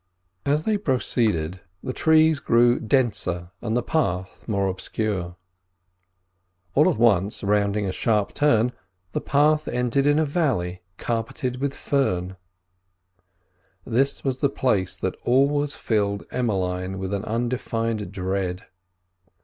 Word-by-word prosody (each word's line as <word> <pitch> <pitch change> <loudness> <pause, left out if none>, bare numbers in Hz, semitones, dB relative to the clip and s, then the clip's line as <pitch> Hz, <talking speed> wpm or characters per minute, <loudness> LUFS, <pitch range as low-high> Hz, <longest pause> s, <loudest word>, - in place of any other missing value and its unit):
As 150 +2 +1
they 215 -1 +2
proceeded 110 - 0 0.2
the 130 - -3
trees 160 0 +4
grew 120 0 +4
denser 105 -8 0
and 115 +1 -1
the 125 - 0
path 95 - -2
more 100 -3 0
obscure. 95 -1 -3 1.4
All - - +5
at - - -1
once, 105 -4 +2
rounding 100 0 +1
a 95 - -1
sharp 105 +1 0
turn, 125 -5 +3 0.4
the - - -2
path 150 +2 +2
ended 125 +3 +1
in 145 0 +4
a 160 - +3
valley 120 - -1 0.2
carpeted 120 +2 -2
with 140 0 -1
fern. 95 -10 -1 1.5
This 135 +4 0
was 130 -2 -1
the 140 - +2
place 95 -10 0
that 95 +1 -2
always 140 +3 +2
filled 100 -2 -1
Emmeline 95 -5 -1
with 95 +1 -4
an 100 0 -2
undefined 115 -3 -2
dread. 95 -1 -2
115 Hz, 125 wpm, -24 LUFS, 95-135 Hz, 1.5 s, All